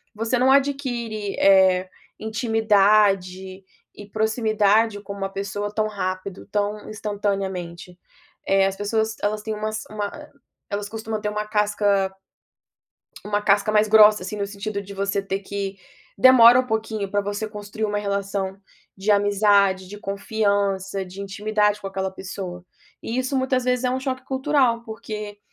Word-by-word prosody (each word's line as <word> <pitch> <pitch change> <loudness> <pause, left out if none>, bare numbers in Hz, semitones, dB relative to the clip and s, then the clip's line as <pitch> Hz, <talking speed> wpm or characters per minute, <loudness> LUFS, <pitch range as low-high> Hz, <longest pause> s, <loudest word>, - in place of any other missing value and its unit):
você 225 +3 0
não 260 +1 +4
adquire, 245 -7 -1
eh, 190 -1 +4 0.3
intimidade 205 -4 +2 0.3
e 205 - -11
proximidade 220 -1 +1
com 200 - -9
uma 195 -1 -3
pessoa 200 +1 -4
tão 215 0 0
rápido, 185 -2 -5
tão 205 +1 -2
instantaneamente. 195 -4 -4 0.5
Eh, 195 0 +4
as 195 - -3
pessoas 220 +2 -1
elas 210 +1 0
têm 220 0 -3
umas 215 +1 -3
uma 210 -1 -3
ah, - - -11 0.4
elas 205 0 -3
costuma 220 0 -4
ter 210 - -2
uma 210 0 -3
casca 205 -2 +1 1.1
uma 205 0 0
casca 205 0 +2
mais 215 0 +3
grossa, 210 -2 +6
assim, 200 +3 -5
no 200 - -2
sentido 200 0 -5
de 200 0 -10
você 200 0 -1
ter 195 0 -3
que 195 0 -5 0.4
demora 245 +1 +8
um 255 - 0
pouquinho 220 -2 -2
pra 205 - +1
você 205 +2 -3
construir 210 +1 -5
uma 205 -1 -2
relação 200 -1 -3 0.4
de 195 +3 +1
amizade, 200 -2 +3
de 205 +2 -10
confiança, 200 -1 -1
de 185 +2 -9
intimidade 210 +1 0
com 195 - -5
aquela 190 0 -3
pessoa. 185 -2 -7 0.4
E 230 - -3
isso 260 +1 -1
muitas 260 -1 0
vezes 250 0 +1
é 250 - +1
um 260 - -1
choque 260 -1 -4
cultural 265 -3 +1
porque, 215 -2 -7
205 Hz, 150 wpm, -23 LUFS, 195-220 Hz, 1.1 s, demora